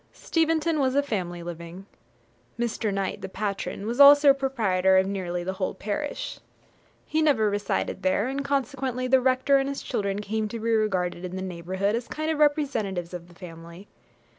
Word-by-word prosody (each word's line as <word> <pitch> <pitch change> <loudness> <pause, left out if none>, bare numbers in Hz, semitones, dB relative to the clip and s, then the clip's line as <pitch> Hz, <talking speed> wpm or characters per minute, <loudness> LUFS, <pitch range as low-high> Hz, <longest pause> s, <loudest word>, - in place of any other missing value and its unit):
Steventon 325 -1 0
was 265 -1 +1
a 285 - +3
family 175 -9 -3
living. 170 +2 -8 0.7
Mr. 230 -2 -1
Knight, 195 +1 -2
the 190 - -6
patron, 200 0 -4
was 235 +4 -3
also 285 0 +9
proprietor 210 -9 +2
of 190 - +4
nearly 180 -3 -3
the 190 +2 -3
whole 190 0 -3
parish. 215 +10 -4 0.7
He 315 - 0
never 245 -9 +3
resided 205 0 -2
there, 190 +4 +1
and 275 +1 -3
consequently 270 -2 -2
the 260 0 +4
rector 260 +2 +3
and 270 0 -1
his 280 - -5
children 200 -5 -2
came 215 +1 -2
to 230 +2 -6
be 230 +1 -1
regarded 185 -5 0
in 180 0 -5
the 190 - -4
neighbourhood 185 +3 -2
as 235 +1 -4
a - - -24
kind 310 +1 -2
of 310 - -2
representatives 235 - 0
of 175 -1 -7
the 175 - -18
family. 170 +2 -11
210 Hz, 180 wpm, -26 LUFS, 185-270 Hz, 0.7 s, also